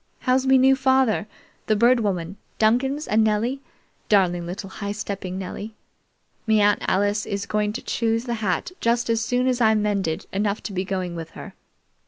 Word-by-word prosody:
How's 260 +1 +1
me 265 0 +6
new 265 +1 +5
father, 260 -5 +2 0.4
the 215 - +3
Bird 240 +3 +4
Woman, 190 -3 -2 0.2
Duncans, 265 +7 +1
and 220 +1 +3
Nellie 225 +5 0 0.5
darling 175 -4 +2
little 190 +2 -6
high 200 0 -4
stepping 195 -3 -5
Nelie? 200 +3 -6 0.7
Me 220 -1 +4
Aunt 205 0 +3
Alice 205 +2 +1
is 200 0 -3
going 210 0 0
to 240 - -6
choose 230 0 0
the 240 -1 -3
hat 200 - -1
just 235 0 +1
as 225 -1 +1
soon 245 +2 0
as 255 -1 +1
I'm 220 -2 +4
mended 195 -5 -1
enough 200 +1 -1
to 205 - -5
be 185 0 -1
going 185 -2 -3
with 165 -1 -6
her. - - -9
215 Hz, 180 wpm, -23 LUFS, 195-240 Hz, 0.7 s, me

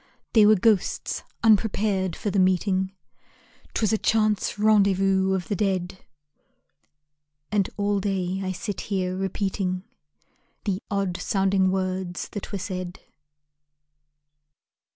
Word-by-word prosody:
They 215 -3 +7
were 215 - +7
ghosts, 210 -1 +1 0.2
unprepared 205 -4 +2
for 205 - -3
the 200 - +1
meeting; 185 +1 +2 0.8
'Twas 220 -1 +1
a 220 - +1
chance 215 -2 +1
rendezvous 195 -2 +3
of 180 -2 -3
the 205 - -1
dead; 185 -2 -1 1.5
And 205 -3 +1
all 205 0 +1
day 190 -1 -1
I 185 - -2
sit 195 +1 -4
here 185 -2 -1
repeating 190 -1 -2 0.8
The 195 -1 -1
odd 195 -4 -1
sounding 195 -1 +1
words 185 -1 -2
that 205 - -7
were 200 - -2
said. 185 -2 -5
195 Hz, 110 wpm, -25 LUFS, 185-205 Hz, 1.5 s, They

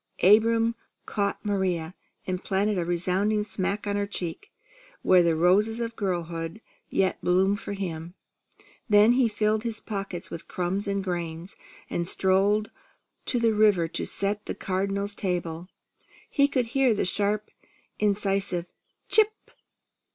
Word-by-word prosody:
Abram 225 +3 +5 0.3
caught 200 0 -2
Maria, 185 -5 -1 0.3
and 185 0 -3
planted 200 0 0
a - - 0
resounding 185 +5 +1
smack 200 +1 -2
on 205 0 -1
her 200 0 -1
cheek, 200 - -5 0.5
where 185 -1 +6
the 170 -2 +2
roses 200 +7 +3
of 230 -1 -3
girlhood 170 -2 -3 0.3
yet 190 -1 0
bloomed 190 +3 +2
for - - -5
him. 175 -3 -5 0.7
Then 210 +2 +6
he 250 0 +4
filled 215 0 +1
his 225 -1 -3
pockets 195 -4 -5
with 165 - -7
crumbs 185 +3 -2
and 200 -1 -1
grain, 170 -2 -4 0.4
and 170 0 -2
strolled 195 +3 +2 0.6
to 250 - +1
the 230 -1 +3
river 210 -6 +4
to - - -3
set 205 +1 -1
the - - -3
Cardinal's 200 +2 -2
table. 175 -3 -3 0.6
He 280 0 +4
could 260 -4 0
hear 265 -4 +3
the - - 0
sharp 205 +3 -1 0.5
incisive 195 -3 +1 0.4
"Chip!" 435 +1 +2
200 Hz, 135 wpm, -26 LUFS, 180-215 Hz, 0.7 s, where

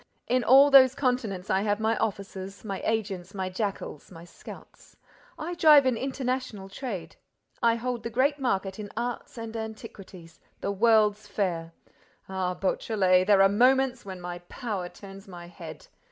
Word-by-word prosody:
In 250 0 +1
all 270 +5 +7
those 265 -1 +7
continents, 245 -9 -1
I 190 - +2
have 205 0 0
my 220 +1 +1
offices, 200 -2 -4
my 195 -2 -4
agents, 200 -4 -2
my 190 -1 -2
jackals, 195 -6 -4
my 170 -1 -11
scouts! 175 - -14 0.4
I 335 +3 -5
drive 305 -5 +6
an 255 -2 +2
international 255 -5 -3
trade. 200 -3 -6 0.4
I 230 -1 +4
hold 240 0 -3
the 230 - -5
great 275 +5 +1
market 195 -6 -1
in 205 -1 -6
art 240 +1 -4
and 225 0 -7
antiquities, 210 -6 -9 0.2
the 200 - -2
world's 215 0 +3
fair! 165 -5 -2 0.5
Ah, 185 -1 -2
Beautrelet, 185 -2 +1
there 200 -2 +6
are - - +7
moments 255 +4 +3
when 190 -2 -8
my 175 0 -6
power 205 -8 -4
turns 195 0 -12
my 175 -2 -10
head! 175 - -11
210 Hz, 155 wpm, -27 LUFS, 190-245 Hz, 0.5 s, all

